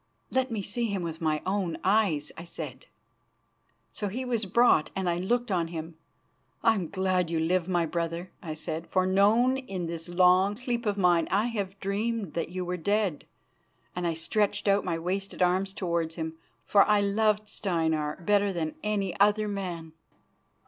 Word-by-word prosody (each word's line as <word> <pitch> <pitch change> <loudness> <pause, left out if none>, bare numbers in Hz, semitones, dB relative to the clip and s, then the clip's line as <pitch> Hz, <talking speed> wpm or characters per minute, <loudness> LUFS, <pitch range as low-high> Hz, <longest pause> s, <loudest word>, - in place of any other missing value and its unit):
"Let 260 0 +1
me 220 -4 -3
see 235 +5 -1
him 200 -5 -2
with 165 -1 -5
my 155 -1 0
own 190 -3 -1
eyes," 190 -7 +2
I 165 - -8
said. 175 - -8 1.0
So 210 - -4
he 250 +7 -4
was 230 -4 -1
brought, 235 -5 +4
and 190 -1 -1
I 170 0 +1
looked 240 +5 0
on 170 -3 +1
him. 165 0 -6 0.7
"I 225 - +6
am 185 -7 -3
glad 185 -3 0
you 165 -1 0
live, 170 +2 +1
my 175 -2 +1
brother," 170 +2 -3
I 155 -3 -5
said, 160 +1 -5
"for 185 -1 +1
know 210 +7 +4
in 195 -10 -4
this 165 0 -5
long 185 +3 +4
sleep 240 0 -2
of 205 -1 0
mine 175 -3 +3
I 205 +3 +2
have 195 -2 -4
dreamed 205 0 -2
that 165 -1 -2
you 180 +1 -4
were 180 +1 -2
dead"; 200 -2 0 0.7
and 180 -1 -1
I 165 - -1
stretched 205 +6 0
out 200 0 +4
my 170 -3 -1
wasted 185 +3 -2
arms 185 +2 +1
towards 170 -4 -2
him, 160 -1 -4 0.3
for 200 - +5
I 210 -1 +4
loved 210 +1 +1
Steinar 160 -5 -1
better 205 -1 +3
than 160 -4 -2
any 200 -4 -1
other 210 +1 +4
man. 175 -6 -5
185 Hz, 175 wpm, -28 LUFS, 170-205 Hz, 1.0 s, I